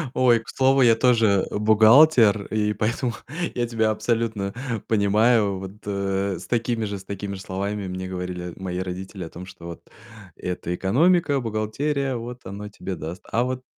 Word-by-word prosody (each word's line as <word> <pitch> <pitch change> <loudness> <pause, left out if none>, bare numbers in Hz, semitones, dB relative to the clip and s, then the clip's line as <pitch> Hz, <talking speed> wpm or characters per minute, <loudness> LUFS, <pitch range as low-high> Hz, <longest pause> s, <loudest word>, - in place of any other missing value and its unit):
Ой, 125 -2 +4
к 115 - -14
слову, 135 +1 +3
я 115 -3 +6
тоже, 115 -5 +3
э, - - -3
бухгалтер, 110 0 +6
и 105 -1 0
поэтому 115 +4 -1 0.4
я 120 -1 0
тебя 110 -2 +1
абсолютно 110 -3 -1 0.3
понимаю. 105 -1 +3
Вот, 95 0 -7
э, 100 -1 -1
с 90 - -10
такими 115 -1 0
же 100 -1 -4
с - - -13
такими 100 0 -5
же 95 - -8
словами 100 +1 -3
мне 95 0 -5
говорили 90 -1 -5
мои 90 -1 -4
родители 95 +1 -5
о 80 - -7
том, 90 +3 -9
что, 90 -2 -13
вот, 85 - -8 0.5
это 90 -1 -4
экономика, 145 - +2
бухгалтерия, 130 +5 -1
вот 120 +1 -7
оно 100 +2 -7
тебе 95 -2 -6
даст, 85 +4 -7
а 115 - +2
вот 130 0 -3
105 Hz, 170 wpm, -24 LUFS, 95-120 Hz, 0.5 s, я